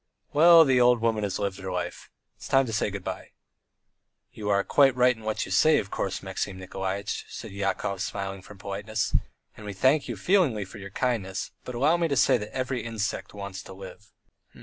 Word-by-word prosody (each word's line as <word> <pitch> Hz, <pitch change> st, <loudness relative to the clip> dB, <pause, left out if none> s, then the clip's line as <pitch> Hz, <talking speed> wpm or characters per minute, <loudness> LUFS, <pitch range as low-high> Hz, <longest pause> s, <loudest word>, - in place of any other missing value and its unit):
"Well, 165 Hz, +2 st, +8 dB
the 130 Hz, -3 st, +4 dB
old 125 Hz, 0 st, +5 dB
woman 110 Hz, -1 st, +1 dB
has 100 Hz, -2 st, -1 dB
lived 100 Hz, -2 st, -3 dB
her 95 Hz, -1 st, -5 dB
life, 90 Hz, -1 st, -4 dB, 0.3 s
it's -, -, -10 dB
time 135 Hz, 0 st, +4 dB
to 115 Hz, -, -5 dB
say 110 Hz, -, +1 dB
good 100 Hz, -2 st, -6 dB
bye." -, -, -6 dB, 1.0 s
"You 105 Hz, -1 st, -5 dB
are 100 Hz, -1 st, +3 dB
quite 135 Hz, +2 st, +4 dB
right 125 Hz, 0 st, +4 dB
in 110 Hz, -, -15 dB
what 110 Hz, 0 st, -2 dB
you -, -, -9 dB
say, 155 Hz, +11 st, +5 dB
of 100 Hz, -, -3 dB
course, 95 Hz, -1 st, -3 dB
Maxim 95 Hz, 0 st, -4 dB
Nikolaitch," 95 Hz, +2 st, -4 dB
said 110 Hz, -, -8 dB
Yakov, 100 Hz, -1 st, -2 dB
smiling 95 Hz, -1 st, -4 dB
from 100 Hz, +2 st, -13 dB
politeness, 100 Hz, +2 st, -3 dB, 0.4 s
"and 110 Hz, -, -12 dB
we 105 Hz, -1 st, -5 dB
thank 135 Hz, +8 st, +2 dB
you 120 Hz, -, -4 dB
feelingly 135 Hz, -, +2 dB
for 95 Hz, +3 st, -11 dB
your 100 Hz, 0 st, -8 dB
kindness, 100 Hz, -4 st, -2 dB
but 125 Hz, -, -7 dB
allow 150 Hz, +8 st, +3 dB
me 170 Hz, -1 st, +1 dB
to 140 Hz, -3 st, -1 dB
say 130 Hz, 0 st, +5 dB
every 130 Hz, -2 st, -2 dB
insect 110 Hz, -3 st, -4 dB
wants 100 Hz, -2 st, -6 dB
to 95 Hz, -, -11 dB
live." 100 Hz, +2 st, -12 dB
105 Hz, 200 wpm, -27 LUFS, 100-125 Hz, 1.0 s, Well